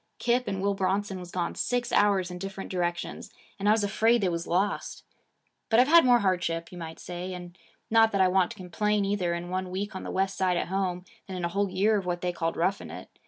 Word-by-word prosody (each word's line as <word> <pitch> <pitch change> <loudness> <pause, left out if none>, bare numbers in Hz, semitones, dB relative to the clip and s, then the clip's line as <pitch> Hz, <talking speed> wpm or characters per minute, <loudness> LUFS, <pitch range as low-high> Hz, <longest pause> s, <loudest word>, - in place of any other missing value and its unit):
Kip 245 0 +1
and 195 -1 -2
Will 200 0 +2
Bronson 195 0 -1
was 180 -1 -9
gone 175 -1 -2
six 245 -1 -1
hours 195 -3 +3
in 180 - -7
different 195 +1 -6
directions; 175 -1 -3 0.3
and 200 +1 +1
I - - +7
was 215 -1 +3
afraid 225 +4 +3
they 190 - +2
was 170 -1 -3
lost. 190 +4 -1 0.7
But 225 - +5
I've 250 - +6
had 335 +2 +7
more 245 -1 +6
hardship, 175 -3 -1
you 180 - -9
might 160 -1 -7
say, 180 +1 -6
and 175 -1 -9 0.4
not 225 0 +5
that 200 - 0
I 190 - +6
want 185 -1 +3
to - - -9
complain 205 +3 0
either, 190 -4 0
in 175 +1 -6
one 185 0 -2
week 195 +2 -4
on 190 - -4
the - - -6
West 195 0 0
Side 185 -2 +2
at - - -2
home, 185 -2 -1 0.2
than 190 -2 -5
in 175 - -2
a - - -1
whole 200 +2 0
year 210 +4 +2
of 190 -3 -4
what 175 -1 -2
they 180 -1 -1
called 165 -1 -2
roughing 190 +4 0
it. - - -9
190 Hz, 245 wpm, -28 LUFS, 180-205 Hz, 0.7 s, I